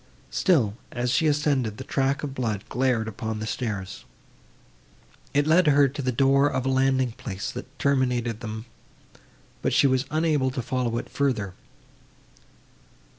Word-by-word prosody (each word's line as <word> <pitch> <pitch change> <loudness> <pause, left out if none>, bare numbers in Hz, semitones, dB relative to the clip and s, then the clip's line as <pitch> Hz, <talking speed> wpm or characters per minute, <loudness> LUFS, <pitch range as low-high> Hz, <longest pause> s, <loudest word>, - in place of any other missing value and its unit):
Still, 135 - +2 0.2
as 125 0 -1
she 155 +5 +3
ascended, 145 -7 +1
the - - -6
track 135 +1 0
of 140 -2 -3
blood 110 -6 -2
glared 125 -3 +1
upon 110 0 -4
the 110 - -4
stairs. 105 -5 -4 1.3
It 145 0 +2
led 165 +2 +4
her 145 -1 +6
to 145 +2 -5
the 130 -1 0
door 135 +3 +4
of 130 -3 -2
a - - +1
landing 130 -1 +2
place, 100 -3 -5
that 135 +2 -9
terminated 125 -5 +1
them, 110 -1 -6 1.0
but - - 0
she - - +4
was 130 0 +2
unable 155 -4 +1
to 130 0 -3
follow 125 -2 -1
it - - -4
farther. 110 -9 -1
130 Hz, 150 wpm, -25 LUFS, 115-140 Hz, 1.3 s, her